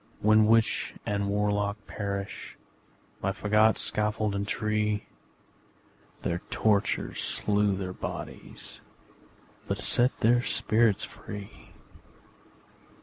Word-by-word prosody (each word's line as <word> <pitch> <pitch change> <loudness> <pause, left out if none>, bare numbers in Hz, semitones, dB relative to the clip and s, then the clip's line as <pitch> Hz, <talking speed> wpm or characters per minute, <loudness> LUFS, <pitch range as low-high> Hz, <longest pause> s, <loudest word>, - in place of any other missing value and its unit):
When 110 0 +5
witch 115 0 +2
and 100 -1 -1
warlock 105 0 0
perished 100 -1 -5 0.6
By 95 - 0
fagot, 105 +2 +3
scaffold 105 0 0
and 100 0 -2
tree, 105 -1 0 1.2
Their 85 - -1
tortures 110 -1 +1
slew 105 -1 +1
their 95 -1 -4
bodies - - -7 0.9
But - - -1
set 125 +2 +3
their 120 +2 +4
spirits 110 -3 +2
free! 100 -2 -10
105 Hz, 90 wpm, -28 LUFS, 100-110 Hz, 1.2 s, When